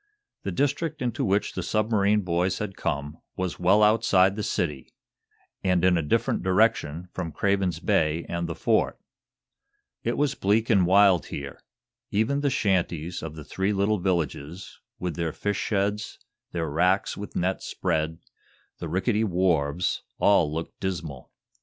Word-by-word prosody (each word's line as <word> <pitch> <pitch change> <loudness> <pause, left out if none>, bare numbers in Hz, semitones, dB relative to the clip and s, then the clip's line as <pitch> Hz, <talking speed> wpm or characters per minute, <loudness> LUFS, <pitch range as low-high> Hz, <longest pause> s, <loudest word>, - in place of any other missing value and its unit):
The 100 - -3
district 145 - -1
into 120 -3 -1
which 100 +1 +1
the 95 - -3
submarine 105 +2 +2
boys 90 0 0
had 105 -3 -4
come 70 +2 -3 0.2
was 95 -1 -3
well 95 +4 +4
outside 100 -3 +4
of - - -9
the - - -1
city, 75 -9 -3 0.7
and 90 -2 +2
in 90 -1 +5
a 85 - +1
different 75 - 0
direction 90 -4 +1
from 85 -3 -4
Craven's 95 -4 0
Bay 85 -5 +1
and 85 0 -3
the 85 - -4
Fort. - - +1 1.1
It 120 - -1
was 145 -1 +1
bleak 110 0 +1
and 95 -5 +4
wild 95 -2 +5
here. 70 -1 -7 0.5
Even 110 +7 +1
the 145 - +2
shanties 90 - 0
of 80 -1 -6
the 75 - -8
three 95 +6 -1
little 100 +1 +1
villages, 85 -1 -3 0.2
with 90 -3 -3
their 85 -2 -2
fish 105 -1 -2
sheds, 105 0 -1 0.3
their 85 -2 -2
racks 90 +6 +1
with 100 0 -8
nets 90 +2 -1
spread, 80 +1 -1 0.6
the 85 - -5
rickety 105 +6 +1
wharves 90 -4 +1 0.2
all 85 -7 +4
looked 80 +2 -5
dismal. 85 -9 -5
95 Hz, 155 wpm, -26 LUFS, 85-105 Hz, 1.1 s, in